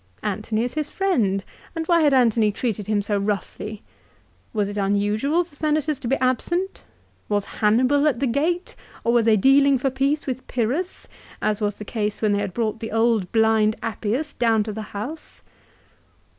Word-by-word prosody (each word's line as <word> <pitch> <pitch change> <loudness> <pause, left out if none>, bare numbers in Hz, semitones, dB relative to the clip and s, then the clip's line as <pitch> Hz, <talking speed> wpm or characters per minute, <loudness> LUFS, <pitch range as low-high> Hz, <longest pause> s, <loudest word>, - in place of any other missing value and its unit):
Antony 215 +2 -1
is 245 - -3
his 300 -1 -2
friend, 225 - +1 0.3
and 325 -1 -2
why 340 0 +4
had 295 -2 +4
Antony 230 -5 +3
treated 210 -2 -3
him 210 -1 +1
so 205 0 0
roughly? 205 +1 -4 0.7
Was 210 -3 0
it 205 - -6
unusual 205 - +1
for 340 -3 -21
Senators 300 0 0
to 260 - -5
be 265 - +2
absent? 345 +10 -1 0.5
Was 205 -1 0
Hannibal 255 +9 +2
at 265 -6 +1
the 275 - +1
gate, 320 +9 -1 0.3
or 235 - +2
were 240 - +5
they 220 -1 +4
dealing 275 +5 +5
for 265 +1 -1
peace 275 +3 0
with 260 -1 -4
Pyrrhus 260 +10 -2 0.3
as 215 0 -1
was 205 -1 0
the 210 - -9
case 210 -1 -2
when 215 -2 +1
they 205 0 +1
brought 220 +3 -2
the 225 -1 -5
old 225 -4 +1
blind 220 -1 +3
Appius 230 +8 -2
down 225 -3 +2
to 215 0 -5
the 220 - -5 0.2
House 275 +10 -7
230 Hz, 175 wpm, -23 LUFS, 210-280 Hz, 0.7 s, were